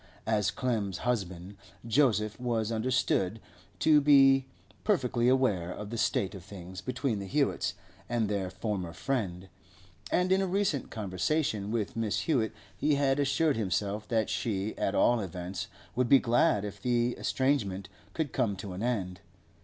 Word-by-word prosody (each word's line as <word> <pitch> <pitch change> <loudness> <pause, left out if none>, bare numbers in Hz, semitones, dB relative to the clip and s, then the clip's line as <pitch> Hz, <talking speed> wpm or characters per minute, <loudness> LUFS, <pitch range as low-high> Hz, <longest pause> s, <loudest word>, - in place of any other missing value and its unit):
As 105 -2 +2
Clem's 105 -6 -1
husband, 100 -5 -2 0.3
Joseph 110 -4 +2
was 115 -3 -1
understood 115 -3 +1 0.4
to 150 -2 +5
be 135 -2 +6 0.4
perfectly 125 - +1
aware 105 -10 +2
of 105 +3 -7
the - - -3
state 95 - +1
of 95 -4 -9
things 95 -2 -9
between 125 -3 -2
the 100 - -6
Hewetts 140 -7 0 0.3
and 115 -2 +1
their 100 -3 -1
former 95 -3 -3
friend, 95 -9 -2 0.6
and 180 +1 +2
in 190 +1 +4
a 190 - 0
recent 185 - 0
conversation 105 - -1
with 110 -2 -1
Mrs. 115 -2 -1
Hewett 120 -9 +1 0.2
he 150 -1 +2
had 140 0 +2
assured 145 +1 +2
himself 105 0 -1
that 110 -2 +1
she, 110 -2 -2
at 100 - -1
all 120 -1 +4
events, 90 -1 -5 0.3
would 125 -1 +1
be 140 - +9
glad 115 -4 +2
if 100 -1 -7
the 120 0 +1
estrangement 105 -9 0 0.3
could 160 -4 -2
come 115 -6 +1
to 95 0 -7
an 90 - -6
end. 95 -6 -2
110 Hz, 155 wpm, -30 LUFS, 100-130 Hz, 0.6 s, be